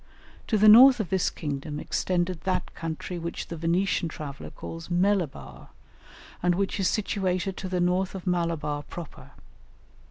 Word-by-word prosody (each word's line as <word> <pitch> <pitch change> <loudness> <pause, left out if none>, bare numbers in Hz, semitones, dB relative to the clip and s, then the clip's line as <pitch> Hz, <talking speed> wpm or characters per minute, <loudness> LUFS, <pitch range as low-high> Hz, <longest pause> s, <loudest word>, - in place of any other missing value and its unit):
To 220 - +2
the 215 +1 +5
north 250 +4 +9
of 205 -6 -3
this 190 -2 +2
kingdom 145 0 -5
extended 180 0 -1
that 185 -1 -2
country 165 +2 -5
which 170 0 -5
the 170 - -4
Venetian 170 +2 0
traveller 145 -3 -7
calls 165 0 -8
Melibar, 175 - -1 0.7
and 175 0 +2
which 195 +2 -1
is 190 - +2
situated 190 -2 -1
to 190 - -5
the 180 -1 -1
north 180 +2 +1
of 190 - -7
Malabar 170 -5 -1
proper. 165 +1 -10
180 Hz, 150 wpm, -26 LUFS, 165-190 Hz, 0.7 s, north